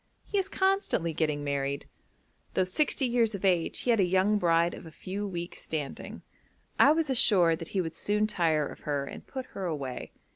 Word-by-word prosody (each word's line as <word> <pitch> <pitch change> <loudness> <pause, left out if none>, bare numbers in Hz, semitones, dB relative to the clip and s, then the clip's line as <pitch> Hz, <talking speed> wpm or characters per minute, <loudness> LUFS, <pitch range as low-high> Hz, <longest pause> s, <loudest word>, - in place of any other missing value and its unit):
He 405 - 0
is 385 0 -2
constantly 380 - +1
getting 150 -2 -1
married. 140 0 -2 0.7
Though 190 - +3
sixty 265 +8 0
years 235 -3 +1
of 200 - -4
age 175 -3 +1
he 245 - +1
had 225 - +3
a - - +5
young 190 +3 +2
bride 170 -1 +2
of - - -10
a - - -11
few 195 +5 -5
weeks' 175 -2 -6
standing. 150 -4 -5 0.6
I 285 - +7
was 315 -2 +1
assured 180 -9 +5
that 165 - -6
he - - +3
would 165 -2 -4
soon 210 +5 +1
tire 165 -7 +1
of - - -9
her 145 -2 -2
and - - -10
put 260 -2 -6
her 195 - -4
away. 140 -7 -4
180 Hz, 195 wpm, -29 LUFS, 160-215 Hz, 0.7 s, I